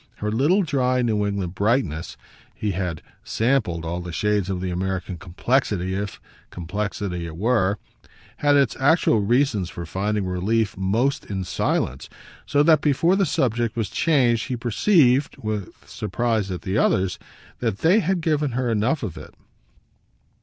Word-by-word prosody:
Her 105 0 -3
little 150 - +3
dry 130 -5 +1
New 105 -3 +1
England 100 -4 -3
brightness 100 - -1 0.4
he 105 - -2
had 90 -4 -3 0.2
"sampled" 110 -9 0
all 85 +2 -3
the 90 0 -6
shades 105 +2 0
of 95 -2 -2
the 90 0 -3
American 95 0 -3
complexity, 95 +2 -1
if 100 0 -4 0.3
complexity 90 -1 -4
it 80 -1 -8
were 100 -2 +2 0.6
had 145 0 +3
its 140 -6 +3
actual 140 -4 +4
reasons 110 -3 +1
for 85 -1 -7
finding 100 +4 -1
relief 100 +4 0
most 115 +10 0
in 95 -2 -3
silence; 90 - -1 0.4
so 145 0 +3
that 155 -2 +5
before 160 +5 +3
the 195 -2 +2
subject 120 -4 0
was 110 -5 -2
changed 125 -8 +2
he 130 -3 -2
perceived 130 - +3
(with 105 -3 -4 0.2
surprise 115 -4 -1
at 90 -2 -5
the 95 +3 0
others) 95 -1 +1 0.4
that 95 - -2
they 180 +7 +5
had 185 -2 0
given 150 -4 0
her 125 -1 0
enough 115 +8 0
of 100 -7 -5
it. - - -13
110 Hz, 155 wpm, -23 LUFS, 95-130 Hz, 0.6 s, that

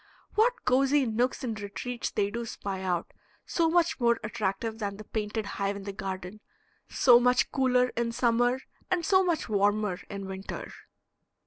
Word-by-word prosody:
What 460 +2 +2
cozy 270 +2 +3
nooks 240 +4 0
and 225 -4 -3
retreats 230 +4 -4
they 200 -1 0
do 235 +2 -3
spy 195 -3 -5
out, 180 -2 -2 0.3
so 330 -1 +1
much 340 -2 +2
more 235 -1 +3
attractive 215 0 -2
than 200 -2 -3
the 215 - -8
painted 215 0 -3
hive 200 0 -2
in 200 - -7
the 200 0 -5
garden, 190 +1 -6 0.5
so 240 -2 +6
much 250 0 +3
cooler 250 -2 +3
in 235 -1 -2
summer 245 +2 +2 0.3
and 360 -3 0
so 375 +2 +5
much 345 -3 0
warmer 205 -2 +1
in 200 -1 -5
winter! 190 0 -6
230 Hz, 160 wpm, -28 LUFS, 200-255 Hz, 0.5 s, so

